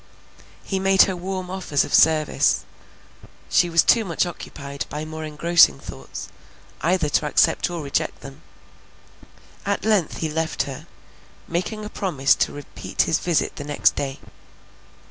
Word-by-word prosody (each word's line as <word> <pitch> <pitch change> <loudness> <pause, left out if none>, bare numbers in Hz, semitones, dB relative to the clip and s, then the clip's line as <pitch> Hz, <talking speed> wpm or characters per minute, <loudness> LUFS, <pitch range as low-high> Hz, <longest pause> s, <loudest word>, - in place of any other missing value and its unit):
He 195 - -2
made 195 0 +5
her 190 - -1
warm 185 0 -5
offers 185 -7 0
of - - -8
service; 155 -1 +3 0.9
she 175 - +4
was 165 0 +4
too 230 - +4
much 175 -3 0
occupied 140 -5 -7
by 150 +1 -5
more 155 0 -7
engrossing 155 - +4
thoughts, - - -9 0.5
either 170 0 +1
to 150 - +1
accept 150 - +2
or 170 -3 -5
reject 140 - -2
them; - - -11 1.2
at 200 0 -2
length 210 -7 +1
he 160 - -2
left 160 0 -1
her, 135 -2 -8 0.6
making 200 +5 -3
a - - -4
promise 160 -10 +1
to - - +1
repeat 145 0 -3
his 160 - +1
visit 170 -3 0
the 145 - -5
next 145 0 +2
day. 135 -1 -3
165 Hz, 145 wpm, -23 LUFS, 150-185 Hz, 1.2 s, made